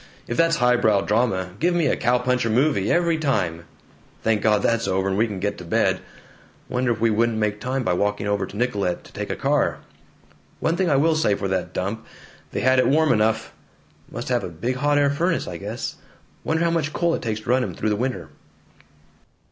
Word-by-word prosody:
If 120 Hz, -, -3 dB
that's 165 Hz, +2 st, +3 dB
highbrow 120 Hz, -4 st, +3 dB
drama, 100 Hz, -4 st, 0 dB
give 175 Hz, +2 st, +2 dB
me 170 Hz, -3 st, +2 dB
a 135 Hz, -, +2 dB
cow 120 Hz, +1 st, +2 dB
puncher 125 Hz, -1 st, 0 dB
movie, 125 Hz, -3 st, +2 dB
every 170 Hz, -2 st, +2 dB
time! 85 Hz, -, -1 dB, 0.6 s
Thank 110 Hz, -2 st, +2 dB
God, 105 Hz, -1 st, +2 dB
that's 115 Hz, 0 st, +1 dB
over, 95 Hz, +1 st, 0 dB
and 95 Hz, -, 0 dB
we 110 Hz, +4 st, +2 dB
can 100 Hz, -3 st, -5 dB
get 100 Hz, +1 st, -2 dB
to -, -, -8 dB
bed. 85 Hz, -, +1 dB, 0.7 s
Wonder 125 Hz, 0 st, 0 dB
if 110 Hz, -, -2 dB
we 115 Hz, 0 st, +2 dB
wouldn't 115 Hz, +1 st, +1 dB
make 105 Hz, -1 st, -1 dB
time 130 Hz, +2 st, -2 dB
by 100 Hz, -, +1 dB
walking 105 Hz, +2 st, -1 dB
over 100 Hz, -2 st, 0 dB
to 100 Hz, -, -10 dB
Nicollet 105 Hz, -7 st, -1 dB
to -, -, -17 dB
take -, -, -5 dB
a -, -, -1 dB
car? -, -, +1 dB, 0.8 s
One 165 Hz, -, +1 dB
thing 185 Hz, -1 st, +1 dB
I 140 Hz, -, +3 dB
will 160 Hz, +4 st, +3 dB
say 105 Hz, -10 st, +2 dB
for 100 Hz, -, -3 dB
that 95 Hz, -1 st, -2 dB
dump: 100 Hz, +4 st, -3 dB, 0.5 s
they -, -, -2 dB
had 130 Hz, 0 st, +4 dB
it -, -, +3 dB
warm 155 Hz, +2 st, +3 dB
enough. 110 Hz, 0 st, 0 dB, 0.6 s
Must 120 Hz, +2 st, -6 dB
have 120 Hz, -4 st, +1 dB
a -, -, -4 dB
big 115 Hz, +11 st, -3 dB
hot 145 Hz, +2 st, +2 dB
air 140 Hz, -1 st, +3 dB
furnace, 165 Hz, +4 st, 0 dB
I 85 Hz, -, -5 dB
guess. 105 Hz, +6 st, -5 dB, 0.5 s
Wonder 160 Hz, +1 st, 0 dB
how 170 Hz, -, +2 dB
much 155 Hz, -2 st, -1 dB
coal 170 Hz, -1 st, +1 dB
it -, -, -2 dB
takes 110 Hz, -2 st, -3 dB
to 110 Hz, -, -11 dB
run 130 Hz, 0 st, +3 dB
'em -, -, -5 dB
through 110 Hz, -, -1 dB
the 105 Hz, -, +1 dB
winter?" 120 Hz, -8 st, -3 dB
115 Hz, 220 wpm, -23 LUFS, 105-140 Hz, 0.8 s, had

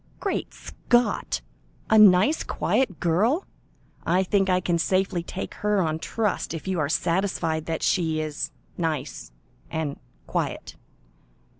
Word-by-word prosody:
"Great 395 Hz, -, -2 dB
Scott! 240 Hz, 0 st, 0 dB, 0.5 s
A 220 Hz, -, +6 dB
nice, 210 Hz, -, +6 dB
quiet 220 Hz, -11 st, 0 dB
girl! 215 Hz, -, +2 dB, 0.6 s
I 180 Hz, +3 st, +2 dB
think 195 Hz, 0 st, +1 dB
I 180 Hz, 0 st, +3 dB
can 175 Hz, -2 st, 0 dB
safely 185 Hz, +1 st, +1 dB
take 185 Hz, +3 st, -6 dB
her 210 Hz, -1 st, +2 dB
on 160 Hz, -3 st, 0 dB
trust, 210 Hz, -1 st, -2 dB
if 165 Hz, -, -7 dB
you 185 Hz, -3 st, 0 dB
are 145 Hz, -2 st, 0 dB
satisfied 165 Hz, -2 st, 0 dB
that 160 Hz, -1 st, -2 dB
she 160 Hz, -4 st, +1 dB
is 155 Hz, -1 st, -3 dB, 0.3 s
nice 155 Hz, -, -3 dB, 0.4 s
and 155 Hz, -3 st, -3 dB, 0.3 s
quiet. -, -, -3 dB
180 Hz, 130 wpm, -25 LUFS, 160-200 Hz, 0.6 s, A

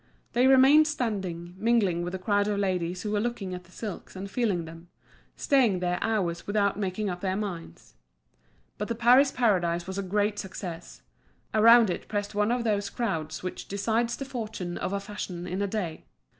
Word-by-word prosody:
They 245 Hz, +2 st, +4 dB
remained 270 Hz, +4 st, +7 dB
standing, 190 Hz, -, -3 dB
mingling 210 Hz, -6 st, +2 dB
with 175 Hz, +1 st, -4 dB
the -, -, -2 dB
crowd 205 Hz, +2 st, +1 dB
of 205 Hz, -1 st, 0 dB
ladies 180 Hz, -2 st, -1 dB
who 210 Hz, -, -3 dB
were 210 Hz, -, +1 dB
looking 215 Hz, -4 st, -3 dB
at 180 Hz, 0 st, -7 dB
the 175 Hz, -, -21 dB
silks 205 Hz, -1 st, -7 dB
and 195 Hz, +1 st, -6 dB
feeling 200 Hz, -7 st, 0 dB
them, 165 Hz, +1 st, -11 dB, 0.5 s
staying 250 Hz, -9 st, +3 dB
there 180 Hz, 0 st, -1 dB
hours 190 Hz, -7 st, -1 dB
without 205 Hz, -1 st, +1 dB
making 200 Hz, +1 st, -2 dB
up 180 Hz, -2 st, -4 dB
their 190 Hz, -1 st, -1 dB
minds. 190 Hz, -5 st, -6 dB, 0.9 s
But -, -, -2 dB
the 230 Hz, -, -2 dB
Paris 250 Hz, +4 st, +5 dB
Paradise 175 Hz, -9 st, +1 dB
was 190 Hz, +1 st, -4 dB
a -, -, 0 dB
great 205 Hz, +2 st, 0 dB
success; 180 Hz, -3 st, -7 dB, 0.5 s
around 230 Hz, -1 st, +7 dB
it -, -, -5 dB
pressed 205 Hz, 0 st, -3 dB
one 210 Hz, +2 st, +1 dB
of 245 Hz, 0 st, 0 dB
those 205 Hz, -3 st, 0 dB
crowds 160 Hz, -11 st, -3 dB
which 185 Hz, -, -5 dB
decides 225 Hz, +4 st, 0 dB
the 275 Hz, -, -5 dB
fortune 220 Hz, -9 st, -5 dB
of -, -, -3 dB
a 200 Hz, -, -1 dB
fashion 195 Hz, -3 st, -6 dB
in 185 Hz, +2 st, -3 dB
a 200 Hz, -, +1 dB
day. 190 Hz, -6 st, -4 dB
200 Hz, 185 wpm, -27 LUFS, 180-225 Hz, 0.9 s, remained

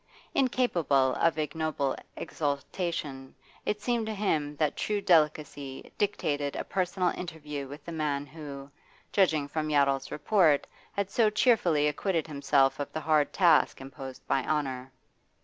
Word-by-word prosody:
Incapable 170 Hz, -, +2 dB
of 165 Hz, -1 st, +2 dB
ignoble 155 Hz, -2 st, -1 dB, 0.2 s
exultation, 145 Hz, -2 st, -3 dB, 0.3 s
it 210 Hz, 0 st, -1 dB
seemed 235 Hz, -3 st, 0 dB
to 220 Hz, -, -3 dB
him 155 Hz, -8 st, 0 dB
that 150 Hz, 0 st, 0 dB
true 210 Hz, -1 st, -1 dB
delicacy 150 Hz, -6 st, +1 dB
dictated 145 Hz, -8 st, 0 dB
a -, -, -2 dB
personal 185 Hz, -1 st, 0 dB
interview 150 Hz, -5 st, -5 dB
with 145 Hz, +3 st, -10 dB
the 170 Hz, -, -6 dB
man 150 Hz, -3 st, -1 dB
who, 140 Hz, -2 st, -9 dB, 0.4 s
judging 160 Hz, -7 st, +3 dB
from 155 Hz, +1 st, -2 dB
Yottle's 140 Hz, -2 st, +2 dB
report, 160 Hz, -4 st, +3 dB, 0.3 s
had 200 Hz, -1 st, -2 dB
so 225 Hz, 0 st, +4 dB
cheerfully 205 Hz, -, +3 dB
acquitted 165 Hz, +3 st, 0 dB
himself 140 Hz, -2 st, +2 dB
of 145 Hz, -, -4 dB
the 155 Hz, -, -3 dB
hard 155 Hz, -2 st, +2 dB
task 175 Hz, -4 st, +4 dB
imposed 135 Hz, -1 st, -9 dB
by 135 Hz, -, +1 dB
honour. 135 Hz, -4 st, -2 dB
150 Hz, 135 wpm, -29 LUFS, 140-180 Hz, 0.4 s, so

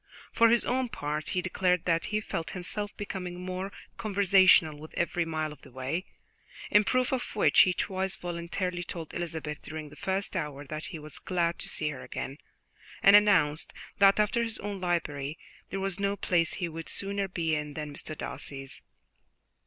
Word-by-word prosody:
For 230 Hz, 0 st, +6 dB
his 235 Hz, +1 st, +4 dB
own 255 Hz, +1 st, +1 dB
part, 150 Hz, -7 st, -3 dB
he 180 Hz, -2 st, 0 dB
declared 180 Hz, -1 st, +1 dB
that 165 Hz, -1 st, +2 dB
he 215 Hz, -, 0 dB
felt 165 Hz, -5 st, -4 dB
himself 205 Hz, +3 st, -4 dB
becoming 180 Hz, -3 st, -5 dB
more 185 Hz, +2 st, -4 dB, 0.3 s
conversational 190 Hz, -6 st, +5 dB
with 155 Hz, +1 st, -11 dB
every 170 Hz, 0 st, 0 dB
mile 155 Hz, -2 st, -2 dB
of -, -, -17 dB
the 140 Hz, -, -14 dB
way, 130 Hz, +8 st, -3 dB, 0.7 s
in 210 Hz, -, +7 dB
proof 255 Hz, +3 st, +1 dB
of 260 Hz, -3 st, -2 dB
which 210 Hz, -, +4 dB
he 180 Hz, -, +5 dB
twice 190 Hz, +2 st, -1 dB
voluntarily 175 Hz, 0 st, -3 dB
told 165 Hz, -2 st, -6 dB
Elizabeth 160 Hz, -3 st, -4 dB
during 155 Hz, -1 st, -7 dB
the 150 Hz, -, -13 dB
first 190 Hz, +6 st, -2 dB
hour 150 Hz, -5 st, -3 dB
that 155 Hz, +2 st, -5 dB
he 170 Hz, -, -6 dB
was 155 Hz, -1 st, -7 dB
glad 170 Hz, -2 st, 0 dB
to -, -, -4 dB
see 155 Hz, -, +1 dB
her 135 Hz, -4 st, -6 dB
again, 135 Hz, +3 st, -6 dB, 0.6 s
and 200 Hz, +1 st, +9 dB
announced 190 Hz, -8 st, +4 dB, 0.3 s
that, 195 Hz, +1 st, +6 dB
after 210 Hz, +3 st, +3 dB
his 230 Hz, -1 st, -1 dB
own 200 Hz, -2 st, -5 dB
library, 155 Hz, -5 st, -1 dB, 0.3 s
there 195 Hz, -, -3 dB
was 195 Hz, 0 st, -2 dB
no 200 Hz, 0 st, +1 dB
place 170 Hz, -4 st, +1 dB
he 175 Hz, -, -2 dB
would 165 Hz, 0 st, -6 dB
sooner 200 Hz, 0 st, 0 dB
be 170 Hz, -4 st, -1 dB
in 150 Hz, -1 st, -2 dB
than 150 Hz, -2 st, -5 dB
Mr. 155 Hz, +1 st, -5 dB
Darcy's. 135 Hz, -1 st, -5 dB
175 Hz, 180 wpm, -29 LUFS, 155-195 Hz, 0.7 s, and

